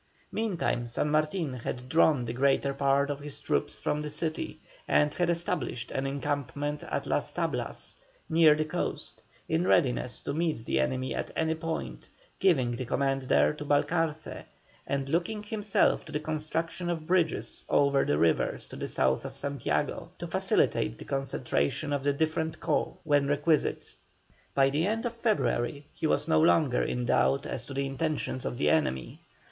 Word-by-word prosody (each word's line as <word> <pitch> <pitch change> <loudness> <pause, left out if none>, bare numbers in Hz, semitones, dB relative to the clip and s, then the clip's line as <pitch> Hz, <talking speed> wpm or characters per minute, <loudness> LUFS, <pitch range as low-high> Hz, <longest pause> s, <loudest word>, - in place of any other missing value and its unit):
Meantime 185 - -1
San 135 +5 -1
Martin 155 0 +1
had 125 0 -5
drawn 150 -3 +4
the 115 - -3
greater 140 +2 +2
part 140 +1 +2
of 145 - -4
his 145 0 -7
troops 145 - -1
from 150 - -1
the 150 - -4
city 155 - -3 0.3
and 150 0 +3
had 175 -1 0
established 170 -8 -2
an 135 +1 -1
encampment 145 +1 -2
at - - -3
Las - - -1
Tablas - - -3 0.3
near 160 -3 +6
the 155 0 0
coast, 155 - -4 0.3
in 165 +3 +1
readiness 125 -5 +2
to 140 - -3
meet 155 -7 -1
the 65 - +1
enemy 130 - 0
at - - -3
any 160 0 +1
point, 160 0 -5 0.3
giving 135 -11 +3
the 120 +2 -3
command 135 +2 0
there 75 - +3
to - - -7
Balcarce, 155 +2 0 0.4
and 140 -1 -1
looking 180 +8 -1
himself 210 -1 +1
to 155 - -10
the 150 - -1
construction 160 +3 -3
of 165 -2 -2
bridges 170 -2 0
over 140 -1 +4
the 75 - +1
rivers 80 -6 +1
to - - -8
the - - -4
south 65 0 +1
of - - -7
Santiago, 140 -3 -2
to - - -5
facilitate 60 -1 +1
the - - -9
concentration 135 - -1
of 140 -1 -1
the 145 - +3
different 160 +2 -1
corps - - 0
when 145 -2 +3
requisite. 145 +2 +1 0.6
By 135 0 +4
the 155 +6 +1
end 225 +3 -1
of 240 - -1
February 145 - 0
he 160 - -1
was 150 - +1
no 160 -1 +4
longer 155 -5 +4
in 125 0 -1
doubt 65 - +2
as - - -4
to 140 - -8
the 140 0 0
intentions 135 -1 -2
of 120 - -3
the - - +3
enemy. 150 - 0
145 Hz, 170 wpm, -29 LUFS, 135-160 Hz, 0.6 s, near